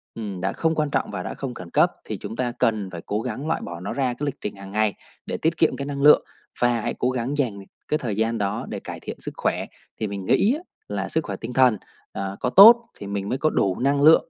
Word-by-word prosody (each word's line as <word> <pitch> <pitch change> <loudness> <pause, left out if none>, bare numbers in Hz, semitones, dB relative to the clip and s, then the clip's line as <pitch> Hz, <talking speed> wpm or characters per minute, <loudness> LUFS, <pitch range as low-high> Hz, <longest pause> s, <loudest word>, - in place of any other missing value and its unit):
ừm, 100 -5 -5
đã 95 +1 -1
không 160 0 0
quan 150 -1 0
trọng - - 0
và 90 -3 -4
đã - - -4
không 135 -3 -5
khẩn 90 -6 -9
cấp - - +4
thì - - -4
chúng 115 - -7
ta 125 -1 -1
cần 110 -4 0
phải 85 -2 -7
cố 105 +2 -1
gắng 130 +5 -4
loại 165 - 0
bỏ 85 -1 -6
nó 90 - -4
ra 135 -2 0
cái 145 - -4
lịch 145 - -2
trình 105 - -4
hàng 100 0 -10
ngày 105 -1 +1 0.3
để - - -3
tiết 160 0 0
kiệm 160 - +3
cái 140 - -4
năng 140 -1 -4
lượng, 150 +1 +7 0.4
và 120 -2 +3
hãy 120 - -2
cố 125 - +2
gắng 130 +3 -2
dành 115 -8 -1 0.3
cái 150 - +1
thời 110 -5 -3
gian 115 +2 0
đó 105 +2 -2
để - - -4
cải - - -7
thiện - - -7
sức - - -5
khỏe. - - 0 0.3
Thì 110 - -1
mình 100 -1 -5
nghĩ 210 - +3
á 320 - -6 0.3
là 95 -2 -2
sức 160 - +1
khỏe 100 - -4
tinh 115 +2 -6
thần 125 -4 +5 0.4
à 95 0 -4
có 125 - 0
tốt 230 - +9
thì 100 - -7
mình 100 0 -3
mới 130 - 0
có 155 +2 +2
đủ 95 -2 0
năng 140 +2 +2
lượng 160 +2 +6
115 Hz, 275 wpm, -24 LUFS, 100-140 Hz, 0.4 s, tốt